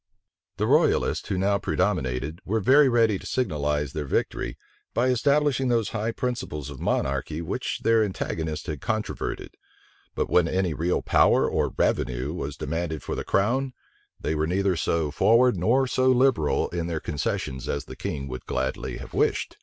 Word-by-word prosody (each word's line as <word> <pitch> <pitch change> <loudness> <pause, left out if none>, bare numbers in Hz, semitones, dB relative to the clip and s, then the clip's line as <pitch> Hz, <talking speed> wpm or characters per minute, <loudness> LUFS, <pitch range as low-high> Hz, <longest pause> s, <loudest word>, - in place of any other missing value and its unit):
The - - 0
royalists, - - +2
who 95 - 0
now 100 +2 +2
predominated, 65 +6 -1
were 110 +4 0
very 135 +6 +5
ready 115 -5 +3
to - - -12
signalize 75 - -1
their 75 -2 -4
victory, - - -2 0.4
by 125 +2 +2
establishing 140 +1 +2
those 115 -4 +1
high 110 +2 -2
principles 115 - -4
of 70 - -9
monarchy 70 +3 -1
which 85 - -3
their 115 -1 +4
antagonists 80 -5 -3
had 75 -5 -5
controverted: 110 -1 -3 0.6
but - - 0
when 90 -2 +3
any 90 -1 0
real 85 +4 0
power - - +4
or - - -1
revenue 65 +4 0
was 75 -4 -5
demanded 80 +1 -3
for - - -4
the - - -3
crown, 130 +7 +1 0.5
they - - -1
were 80 0 0
neither 95 +1 +1
so 80 -2 0
forward 115 - +4
nor 115 +10 +2
so 130 0 +1
liberal 130 - +3
in 85 -1 -3
their 80 -2 -2
concessions 65 -4 -3
as 70 - -2
the - - -9
king 70 -2 -4
would 65 -1 -7
gladly 65 +1 -2
have - - -10
wished. - - 0
90 Hz, 165 wpm, -25 LUFS, 75-115 Hz, 0.6 s, very